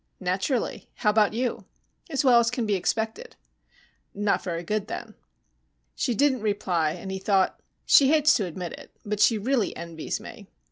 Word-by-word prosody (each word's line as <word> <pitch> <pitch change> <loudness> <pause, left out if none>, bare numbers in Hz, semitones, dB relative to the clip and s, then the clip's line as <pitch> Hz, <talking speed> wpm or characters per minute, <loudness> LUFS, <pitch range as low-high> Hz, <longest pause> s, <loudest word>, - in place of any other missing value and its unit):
"Naturally. 190 +7 -2
How 210 - +2
about 215 0 +2
you?" 245 +1 -2 0.4
"As 285 -2 0
well 245 -2 +7
as 235 0 +2
can 245 -1 -2
be 210 - 0
expected." 220 - -2 0.8
"Not 205 0 0
very 170 -2 -3
good, 210 +3 -2
then." - - -6 0.8
She 240 - -1
didn't 270 -2 +2
reply, 180 -7 0
and 190 - -7
he 190 - -4
thought, 190 -1 +1 0.3
_She 275 - +7
hates 305 +1 +5
to 205 - -1
admit 175 0 -6
it, - - -11 0.2
but 210 0 -3
she 225 +1 +4
really 235 +1 0
envies 165 -1 -5
me. - - -11
210 Hz, 170 wpm, -26 LUFS, 190-245 Hz, 0.8 s, well